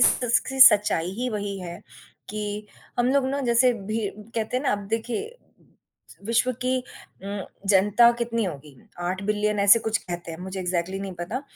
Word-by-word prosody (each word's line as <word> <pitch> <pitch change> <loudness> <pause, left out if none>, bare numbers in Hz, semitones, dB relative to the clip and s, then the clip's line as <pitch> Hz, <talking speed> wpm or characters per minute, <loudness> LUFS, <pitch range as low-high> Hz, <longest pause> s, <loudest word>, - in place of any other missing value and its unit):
स - - +8 0.2
स 260 +2 +4
सच्चाई 200 -4 0
ही 250 0 -1
वही 205 -2 -3
है 175 -1 -7 0.5
कि 210 0 -4 0.3
हम 245 - +3
लोग 280 -2 +2
ना 280 +1 -1
जैसे 245 0 +4
भी 215 0 -3 0.3
कहते 225 +2 -1
हैं 260 - -1
ना, 275 - +1
अब 205 - 0
देखिए 245 - -3 0.9
विश्व 235 +3 +2
की 255 +1 +2
उम, 200 -5 -9 0.2
जनता 205 +4 +5
कितनी 230 -1 -1
होगी? 150 -5 -7 0.2
8 185 +2 -2
बिलियन 210 0 0
ऐसे 200 +3 +7
कुछ 220 - +2
कहते 175 -1 -7
हैं, 160 - -8
मुझे 190 +1 -5
एग्ज़ैक्टली 180 +1 -2
नहीं 195 -1 -5
पता, 230 +11 -4
210 Hz, 170 wpm, -25 LUFS, 190-235 Hz, 0.9 s, स